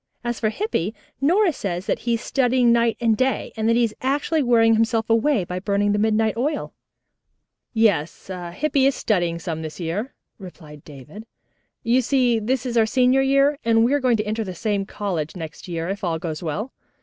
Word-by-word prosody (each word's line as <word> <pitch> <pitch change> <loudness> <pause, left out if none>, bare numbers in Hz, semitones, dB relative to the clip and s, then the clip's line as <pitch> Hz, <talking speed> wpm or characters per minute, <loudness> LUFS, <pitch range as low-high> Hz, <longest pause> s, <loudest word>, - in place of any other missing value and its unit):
As 240 -1 -3
for 215 - +1
Hippy, 220 - -2 0.3
Nora 350 +5 +3
says 185 -6 -4
that - - -1
he 235 -1 0
is 230 - -5
studying 250 -2 +2
night 235 -1 +2
and 230 -2 +2
day, 260 +3 -1
and 220 0 0
that 230 - +3
he 240 - +3
is 225 -2 0
actually 285 +4 0
wearing 230 -3 +4
himself 225 0 +1
away 230 -1 +2
by 180 +1 -5
burning 200 +1 0
midnight 220 +1 +1
oil." 290 +5 -2 1.0
"Yes, 200 -6 0 0.2
Hippy 275 +4 +2
is 275 - +1
studying 175 -6 0
some 165 -2 -5
this 155 +1 -7
year," 185 - -4 0.2
replied 155 -6 -12
David. 150 - -12 0.6
"You 245 +2 +3
see 250 -2 +2
this 250 +4 -1
is 240 -2 -2
our 220 -1 +4
senior 255 +2 +3
year, 275 +2 +3
and 225 0 +3
we 255 - +1
are 290 - +3
going 250 -4 +2
to 210 - -2
enter 220 +2 -2
the 185 -3 -7
same 200 +1 -2
college 180 -8 -4
next 165 -1 -8
year, 165 -1 -3
if 200 +2 -4
all 170 -3 0
goes 160 -1 -5
well. 195 - -4
225 Hz, 195 wpm, -22 LUFS, 185-255 Hz, 1.0 s, wearing